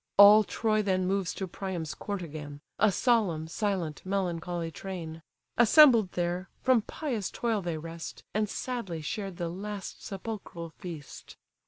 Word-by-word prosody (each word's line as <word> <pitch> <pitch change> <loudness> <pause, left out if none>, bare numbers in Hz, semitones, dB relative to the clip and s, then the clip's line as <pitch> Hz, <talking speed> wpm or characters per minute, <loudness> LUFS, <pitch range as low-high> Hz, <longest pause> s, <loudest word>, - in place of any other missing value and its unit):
All 205 +2 +10
Troy 215 +1 +1
then 185 -2 +1
moves 190 -1 0
to 190 - -3
Priam's 175 -4 -4
court 200 -3 -4
again, 145 -3 -7 0.2
A 215 -1 +5
solemn, 190 -8 +2
silent, 180 -3 -2
melancholy 175 -3 -2
train: 165 -3 -6 0.4
Assembled 235 - +7
there, 175 +1 -1
from 255 -3 +5
pious 235 -4 -3
toil 225 -3 -1
they 170 -3 -2
rest, 165 +1 -7
And 215 0 +1
sadly 200 -12 -4
shared 195 +2 -4
the 170 -1 -2
last 200 +3 -6
sepulchral 195 -5 -6
feast. 165 -7 -9
190 Hz, 140 wpm, -29 LUFS, 170-210 Hz, 0.4 s, All